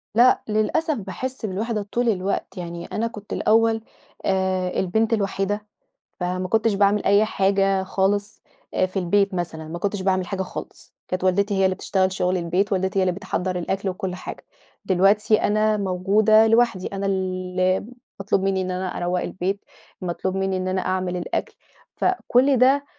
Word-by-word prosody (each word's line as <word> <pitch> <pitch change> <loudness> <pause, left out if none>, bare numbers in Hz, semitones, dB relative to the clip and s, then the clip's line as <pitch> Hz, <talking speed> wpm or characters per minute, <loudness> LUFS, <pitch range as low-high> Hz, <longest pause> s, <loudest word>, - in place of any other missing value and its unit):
لأ، 245 +2 +5
للأسف 220 +10 +1
باحِسّ 230 +5 -5
بالوِحدة 215 +2 -2
طول 240 -1 +1
الوقت 195 -1 -2
يعني 170 -1 -6
أنا 230 +2 -2
كنت 210 -3 -8
الأول 225 0 +3 0.4
آآ، 190 -1 0
البنت 220 +5 +1
الوحيدة 205 0 -1 0.5
فما 185 +1 -2
كنتش 220 +2 +2
باعمِل 200 +1 +3
أي 200 +2 +5
حاجة 195 -1 +2
خالص 200 +2 -1 0.4
في 190 +1 -3
البيت 195 +3 +2
مثلًا، 160 -3 -4
ما 170 +2 -6
كنتش 200 +1 -2
باعمِل 185 -1 +1
حاجة 190 +1 -3
خالص، 190 - -8
كانت 185 0 -3
والدتي 200 +2 +2
هي 190 - +4
اللي 185 - +2
بتشتغل 190 0 0
شغل 185 0 0
البيت، 180 +4 0
والدتي 190 +1 0
هي - - +3
اللي 185 - +2
بتحضّر 185 -1 -3
الأكل 190 +3 -2
وكُلّ 185 0 -4
حاجة، - - -8 0.4
دلوقتي 200 +3 +3
أنا 215 +1 +2
موجودة 200 +3 +4
لوحدي، 225 -4 +2
أنا 200 0 -4
ال 195 - +1 0.5
اللي 185 +1 +2 0.3
مطلوب 195 0 +1
مني 195 -1 +1
إن 185 0 -3
أنا 185 0 -3
أروّق 175 +1 -1
البيت، 195 +2 -2 0.4
مطلوب 185 +1 -2
مني 195 -1 0
إن 185 0 -3
أنا 185 0 0
أعمل 185 -1 -1
الأكل، 175 - -3 0.4
فكُلّ 275 -7 +2
ده 270 +3 +4
195 Hz, 160 wpm, -23 LUFS, 185-215 Hz, 0.5 s, لأ